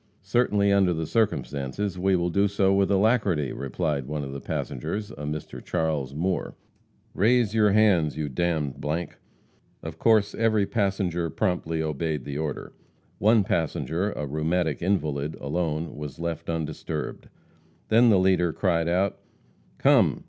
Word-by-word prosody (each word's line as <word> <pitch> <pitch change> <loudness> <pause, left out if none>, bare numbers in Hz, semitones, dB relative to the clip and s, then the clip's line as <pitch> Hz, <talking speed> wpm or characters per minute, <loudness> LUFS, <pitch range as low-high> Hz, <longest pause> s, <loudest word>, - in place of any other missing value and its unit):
"Certainly, 100 -1 +2
under 95 -3 +3
the 80 0 -2
circumstances, 80 - -1
we 95 +1 +2
will 85 0 0
do 100 +3 +3
so 95 -1 +2
with 100 0 +2
alacrity," 100 - +2
replied 70 0 -2
one 75 0 -3
of 70 - -6
the 70 - -6
passengers, 105 - -4
a 75 - -7
Mr. 75 0 -6
Charles 75 -4 -2
Moore. 90 +4 -2 0.6
"Raise 115 -1 +3
your 110 -2 +4
hands, 100 -8 +3
you 75 -1 -2
d 70 - -8 0.5
d 80 +4 -2 0.3
." - - -37
Of - - -7
course 110 -3 +3
every 110 -3 +2
passenger 95 -6 -1
promptly 80 -1 -1
obeyed 75 -2 -2
the 70 +1 -4
order. 80 -1 -4 0.5
One 110 0 +4
passenger, 85 +2 -1
a 75 - -4
rheumatic 80 +2 -1
invalid, 75 -6 -1
alone, 80 +2 -2
was 75 -2 -7
left 85 -1 -4
undisturbed. 80 -2 -4 0.6
Then 115 +2 +6
the 105 - +5
leader 90 -2 +3
cried 85 -2 0
out: 95 +3 0 0.6
"Come! - - +4
85 Hz, 145 wpm, -26 LUFS, 75-100 Hz, 0.6 s, Then